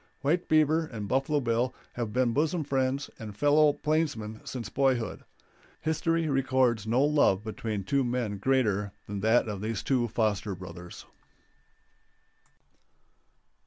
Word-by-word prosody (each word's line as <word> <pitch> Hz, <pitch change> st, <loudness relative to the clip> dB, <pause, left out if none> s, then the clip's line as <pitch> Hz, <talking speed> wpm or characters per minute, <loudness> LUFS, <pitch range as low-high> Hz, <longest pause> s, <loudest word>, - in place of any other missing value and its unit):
White 165 Hz, +6 st, +1 dB
Beaver 155 Hz, +1 st, +3 dB
and 105 Hz, -6 st, -6 dB
Buffalo 135 Hz, +5 st, +1 dB
Bill 120 Hz, +1 st, 0 dB, 0.2 s
have 120 Hz, -3 st, -3 dB
been 125 Hz, 0 st, +1 dB
bosom 160 Hz, +4 st, +1 dB
friends 135 Hz, 0 st, -1 dB
and 105 Hz, -2 st, -8 dB
fellow 145 Hz, +4 st, +5 dB
plainsmen 145 Hz, -9 st, -2 dB
since 120 Hz, -5 st, -5 dB
boyhood. 130 Hz, 0 st, 0 dB, 0.6 s
History 160 Hz, +1 st, 0 dB
records 130 Hz, -5 st, +1 dB
no 120 Hz, +5 st, +3 dB
love 145 Hz, -10 st, +3 dB
between 110 Hz, -2 st, -4 dB
two 135 Hz, +7 st, +1 dB
men 120 Hz, -5 st, -2 dB
greater 105 Hz, -5 st, +1 dB
than 100 Hz, 0 st, -5 dB
that 110 Hz, +3 st, +3 dB
of 100 Hz, -3 st, -4 dB
these 110 Hz, -1 st, -3 dB
two 125 Hz, -3 st, +1 dB
foster 105 Hz, -3 st, -1 dB
brothers. 90 Hz, -1 st, -10 dB
125 Hz, 125 wpm, -28 LUFS, 105-145 Hz, 0.6 s, fellow